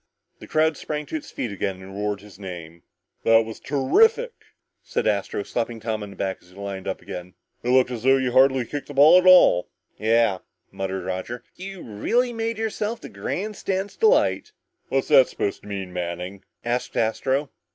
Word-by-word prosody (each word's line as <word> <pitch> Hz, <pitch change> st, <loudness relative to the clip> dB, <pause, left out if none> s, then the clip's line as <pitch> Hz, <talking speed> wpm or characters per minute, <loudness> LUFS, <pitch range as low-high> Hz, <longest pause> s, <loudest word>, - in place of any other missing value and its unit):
The -, -, -11 dB
crowd 155 Hz, 0 st, +2 dB
sprang 150 Hz, -1 st, -4 dB
to 155 Hz, -, -6 dB
its 155 Hz, -, -5 dB
feet 120 Hz, -, -4 dB
again 95 Hz, -1 st, -3 dB
and 95 Hz, +1 st, -11 dB
roared 105 Hz, -1 st, -2 dB
his 105 Hz, -2 st, -15 dB
name. 85 Hz, -3 st, -8 dB, 0.4 s
"That 115 Hz, 0 st, +5 dB
was 110 Hz, 0 st, -8 dB
terrific!" 445 Hz, -, +3 dB, 0.5 s
said -, -, -2 dB
Astro, 425 Hz, -3 st, 0 dB
slapping 120 Hz, -, -3 dB
Tom 110 Hz, -1 st, -3 dB
on 105 Hz, -, -6 dB
the 100 Hz, -, -12 dB
back 95 Hz, -1 st, -3 dB
as 90 Hz, -, -22 dB
they 90 Hz, +2 st, -15 dB
lined 100 Hz, -2 st, -5 dB
up 95 Hz, -, -4 dB
again. 90 Hz, 0 st, -8 dB, 0.3 s
"It 120 Hz, -, -3 dB
looked 125 Hz, 0 st, +4 dB
as 120 Hz, -3 st, -4 dB
though 135 Hz, +2 st, +5 dB
you 130 Hz, -2 st, 0 dB
hardly 130 Hz, 0 st, +4 dB
kicked 145 Hz, +4 st, -6 dB
that 145 Hz, -, -9 dB
ball 150 Hz, +6 st, +8 dB
at 185 Hz, -, +1 dB
all." 180 Hz, -, +7 dB, 0.3 s
"Yeah," 110 Hz, -2 st, +3 dB, 0.3 s
muttered 95 Hz, -1 st, -4 dB
Roger, 95 Hz, +6 st, -4 dB
"you 190 Hz, 0 st, -8 dB
really 240 Hz, -, 0 dB
made 225 Hz, -1 st, -2 dB
yourself 220 Hz, 0 st, -2 dB
the -, -, -10 dB
grandstand's 195 Hz, -1 st, -3 dB
delight!" 440 Hz, -1 st, +2 dB, 0.4 s
"What's 135 Hz, 0 st, 0 dB
that 135 Hz, -4 st, +7 dB
supposed 100 Hz, -, -3 dB
to -, -, -14 dB
mean, 95 Hz, -3 st, -5 dB
Manning?" 90 Hz, +2 st, -5 dB, 0.2 s
asked 120 Hz, +1 st, -2 dB
Astro. 130 Hz, +5 st, 0 dB
120 Hz, 185 wpm, -24 LUFS, 100-155 Hz, 0.5 s, ball